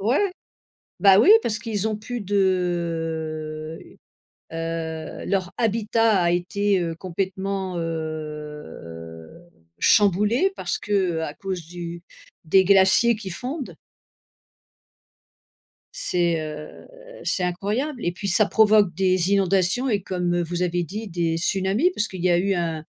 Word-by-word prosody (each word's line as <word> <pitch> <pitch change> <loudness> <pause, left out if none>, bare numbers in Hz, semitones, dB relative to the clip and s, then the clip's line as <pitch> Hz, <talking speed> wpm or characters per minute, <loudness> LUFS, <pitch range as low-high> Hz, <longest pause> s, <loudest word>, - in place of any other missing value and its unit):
Ouais, 280 - +1 0.7
bah 195 -1 +7
oui, 370 - +7
parce 215 -1 -1
qu'ils 220 -3 -3
ont 215 -1 -2
plus 240 +1 -5
de, 165 -5 -2 0.7
heu - - -11
heu, 165 -1 -5
leur 190 -2 -1
habitat 225 -2 +2
a 170 0 +2
été, 195 +2 +1
heu, 165 -1 -2
complètement, 190 +1 -3
heu, 150 - -6 0.5
chamboulé 210 - +3
parce - - -2
qu'à 175 -7 -1
cause 185 -4 -4
du 170 -1 -7 0.4
des 190 +4 +5
glaciers 200 +4 +5
qui 200 -3 -7
fondent 260 - -5 2.2
c'est, 175 - +1
heu, 150 0 -8 0.3
c'est 185 - 0
incroyable 215 - -2
et 175 - +1
puis 185 +3 -6
ça 200 +3 +4
provoque 210 -4 +4
des 185 -1 +2
inondations 195 +5 +2
et 205 -5 0
comme 175 -2 -1
vous 175 +1 -3
avez 175 0 0
dit 210 +6 -6
des 165 -3 -1
tsunamis 195 - +1
parce 210 - -1
qu'il 185 -2 -8
y 180 - +4
a 175 - +4
eu 195 +2 +1
un 165 -3 -2
185 Hz, 130 wpm, -23 LUFS, 165-205 Hz, 2.2 s, bah